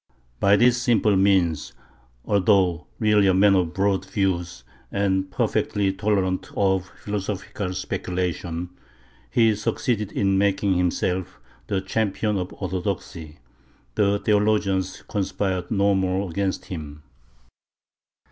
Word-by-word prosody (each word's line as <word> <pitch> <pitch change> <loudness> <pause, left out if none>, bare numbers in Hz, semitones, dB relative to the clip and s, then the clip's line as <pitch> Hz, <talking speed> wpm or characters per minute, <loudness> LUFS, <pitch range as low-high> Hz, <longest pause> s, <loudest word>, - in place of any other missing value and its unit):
By 100 +1 +5
this 120 +3 +4
simple 110 -5 +3
means, 95 -5 +2 0.5
although 95 -5 +2
really 105 -2 +3
a 95 - +4
man 100 +1 +5
of 90 -4 +1
broad 95 -1 +1
views 90 -7 -2 0.3
and 95 -1 0
perfectly 95 +1 0
tolerant 95 -2 0
of 95 -2 +1
philosophical 100 -1 -4
speculation, 90 -1 -3 0.6
he 115 - +4
succeeded 105 0 -1
in 95 -1 +1
making 100 0 +2
himself 90 0 -1 0.3
the 95 -2 -1
champion 105 +1 -1
of 90 - -4
orthodoxy; 90 -4 -5 0.5
the 100 -1 +2
theologians 100 -3 +1
conspired 95 -2 -2
no 100 -1 +2
more 95 +1 0
against 95 +2 -2
him. 75 -4 -8
95 Hz, 110 wpm, -24 LUFS, 90-100 Hz, 0.6 s, By